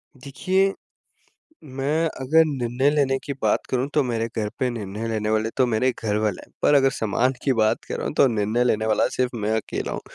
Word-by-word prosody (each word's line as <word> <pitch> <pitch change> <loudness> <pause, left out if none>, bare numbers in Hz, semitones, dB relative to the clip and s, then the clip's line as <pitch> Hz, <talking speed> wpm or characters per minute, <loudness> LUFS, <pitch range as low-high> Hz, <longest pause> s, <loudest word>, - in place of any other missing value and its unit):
देखिए, 185 +9 0 0.9
मैं 145 +3 -1 0.2
अगर 160 +5 +5
निर्णय 130 -2 0
लेने 135 -2 +2
की 140 - -4
बात - - +1
करूँ 130 +1 0
तो 150 - +3
मेरे 115 -2 -1
घर 105 -1 -1
पे 130 - +1
निर्णय 110 -1 -5
लेने 110 -1 -2
वाले 110 +1 +1
तो 130 - +4
मेरे 120 +3 +1
घर 105 -2 0
वाले 105 -3 -1
हैं। - - -29
पर - - +4
अगर 135 -1 +5
सामान 120 +3 0
की 135 - +2
बात 110 -2 +1
कर - - -5
रहा - - -4
हूँ - - -4
तो - - +5
निर्णय 110 +1 0
लेने 110 -3 +1
वाला 110 -1 +2
सिर्फ़ 125 -1 -1
मैं 105 0 -1
अकेला 110 - -3
हूँ। - - -4
125 Hz, 215 wpm, -23 LUFS, 110-135 Hz, 0.9 s, अगर